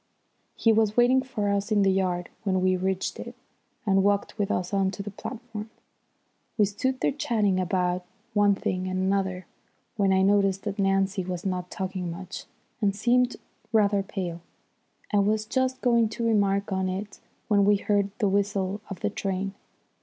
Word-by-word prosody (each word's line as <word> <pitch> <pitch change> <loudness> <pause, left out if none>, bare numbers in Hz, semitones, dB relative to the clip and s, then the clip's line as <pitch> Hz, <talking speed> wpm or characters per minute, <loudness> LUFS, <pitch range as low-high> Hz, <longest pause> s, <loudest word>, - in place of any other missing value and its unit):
He 225 - +3
was 215 0 +2
waiting 250 +2 +5
for 255 -6 -3
us 200 +1 -1
in 205 -2 +4
the 195 - +4
yard 180 -2 0
when 190 -3 +1
we 185 0 +3
reached 190 +1 -2
it, - - -7 0.5
and 195 -2 +4
walked 200 +1 +1
with 205 -2 -1
us 180 0 -1
on 195 -1 +2
to 195 +1 -6
the 205 - -6
platform. 225 0 -7 0.9
We 210 - +5
stood 255 +6 -2
there - - +2
chatting 215 -9 +1
about 180 0 0 0.3
one 205 -1 +4
thing 185 -1 -2
and 185 0 -2
another, 190 -1 0 0.5
when 200 -2 +3
I 190 0 +4
noticed 195 -1 +3
that 205 -1 -4
Nancy 195 0 +1
was 180 0 -5
not 180 -2 -2
talking 185 -2 -4
much 180 +2 -7 0.4
and 200 -2 +2
seemed 245 +3 +2 0.4
rather 205 -3 +3
pale. 180 -3 -5 0.7
I 205 - +5
was 215 +2 +1
just 260 +3 -1
going 235 -3 +3
to 235 - -1
remark 200 -3 +2
on 190 -1 0
it 195 +2 -5 0.3
when 205 -2 +4
we 205 +1 +5
heard 200 0 +1
the 215 - +2
whistle 200 0 0
of 195 -3 -7
the - - 0
train. 195 -1 -2
200 Hz, 175 wpm, -26 LUFS, 190-215 Hz, 0.9 s, waiting